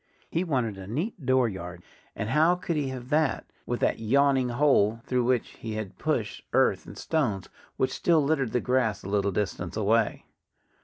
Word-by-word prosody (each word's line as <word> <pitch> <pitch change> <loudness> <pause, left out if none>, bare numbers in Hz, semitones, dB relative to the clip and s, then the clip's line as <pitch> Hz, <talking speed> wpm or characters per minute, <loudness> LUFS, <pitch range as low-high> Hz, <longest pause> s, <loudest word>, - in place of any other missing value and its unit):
He 170 - +1
wanted 125 - -1
a 95 - -8
neat 160 - -3
dooryard. 95 -10 0 0.3
And 110 -1 -3
how 160 +6 +4
could 180 -2 -3
he 145 -2 0
have 130 -1 -6
that, 155 -1 +1 0.2
with 120 - -2
that - - +1
yawning 135 +2 +3
hole 120 -4 +3
through 125 -1 +1
which 125 -2 +1
he 110 -1 -7
had 110 -3 -6
pushed - - -1
earth - - +2
and - - -10
stones, 120 - -1 0.3
which 130 - 0
still 165 -3 +3
littered 140 -5 +1
the 125 - +1
grass 125 -6 0
a - - -7
little 100 0 +1
distance 90 -2 -3
away? 110 +1 +1
125 Hz, 175 wpm, -27 LUFS, 105-140 Hz, 0.3 s, how